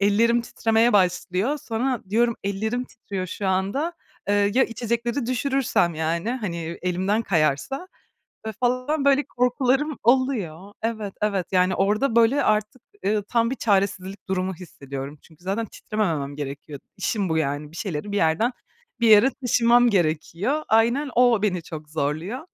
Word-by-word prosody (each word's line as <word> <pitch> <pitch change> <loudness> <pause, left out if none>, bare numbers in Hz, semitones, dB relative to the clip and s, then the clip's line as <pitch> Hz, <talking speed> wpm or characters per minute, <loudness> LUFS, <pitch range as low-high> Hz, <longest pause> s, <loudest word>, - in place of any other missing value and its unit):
ellerim 230 +4 +3
titremeye 225 0 +1
başlıyor. 190 - +1
Sonra 245 0 -2
diyorum, 235 +1 +2
ellerim 220 +5 -1
titriyor 195 -6 -6
şu 195 +2 -4
anda. 200 - 0 0.4
Iıı, 205 0 +3
ya 265 - +5
içecekleri 235 +2 -2
düşürürsem, 255 - +1
yani, 165 +7 -1
hani, 210 -9 -3 0.3
elimden 190 +5 0
kayarsa. 165 - 0 0.6
Ve - - -2
falan, 255 +4 0
böyle, 280 +1 +4
korkularım 260 +4 +1
oluyor. 215 - +1
Evet, 220 -3 -3
evet. 200 -4 0
Yani, 185 0 +3
orada, 215 +6 +1
böyle, 235 +5 +4
artık, 215 +3 0 0.2
ııı, 210 0 +1
tam 230 +2 +1
bir 265 - -2
çaresizlik 195 -3 -1
durumu 190 0 -1
hissediyorum. 140 -4 -8
Çünkü 160 +1 -21
zaten 200 +5 -1
titrememem 165 -11 -3
gerekiyor, 145 0 -6 0.2
işim 200 -5 -1
bu, 160 - +1
yani. 145 0 -2
Bir - - -14
şeyleri 195 -1 -4
bir 205 - -1
yerden 165 +8 +2 0.5
bir 235 - +3
yere 215 +5 +7
taşımam 240 0 +4
gerekiyor. 185 - 0
Aynen, 235 +6 +2
o 240 -3 +4
beni 185 -5 0
çok 155 -2 -9
zorluyor. 155 - -2
210 Hz, 145 wpm, -24 LUFS, 180-240 Hz, 0.6 s, yere